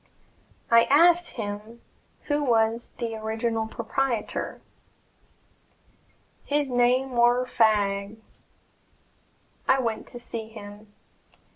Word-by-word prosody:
I 230 0 +7
asked 340 +4 +5
him 215 +1 -6 0.4
who 290 0 0
was 230 -2 +1
the 230 -1 -3
original 220 +1 -2
proprietor. 230 0 -3 1.8
"His 290 -2 -1
name 250 +2 +2
war 240 +1 +3
Fagg." 205 -3 +1 1.5
I 265 - +5
went 230 -4 -2
to - - -9
see 230 -2 -6
him. 205 -1 -12
230 Hz, 90 wpm, -26 LUFS, 220-255 Hz, 1.8 s, I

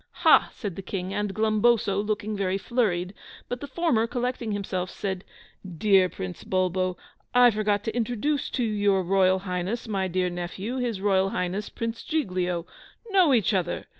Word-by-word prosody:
"Ha," - - +7
said 200 -7 -6
the - - -5
King 190 0 -4
and 205 0 -1
Glumboso, 215 -1 +2
looking 215 0 -2
very 195 -1 0
flurried; 195 -5 0 0.3
but 245 - -4
the 285 - -5
former, 265 -5 +1
collecting 245 -2 -2
himself, 190 -3 -2
said, 190 -2 -4 0.5
"Dear 190 0 +4
Prince 90 - -7
Bulbo, 185 -1 0 0.4
I 245 -1 +7
forgot 210 -1 0
to 225 - -3
introduce 245 +5 -1
to 250 - -1
your 205 -3 +2
Royal 185 +1 +3
Highness 190 +5 -3
my 195 -3 -1
dear 180 0 0
nephew, 180 +7 -4
his 235 -6 -2
Royal 195 -1 +2
Highness 190 +3 -2
Prince 230 0 -4
Giglio! 180 - -1 0.5
Know 370 -6 +5
each 230 -4 +3
other! 180 -3 -1
205 Hz, 160 wpm, -26 LUFS, 185-230 Hz, 0.5 s, Ha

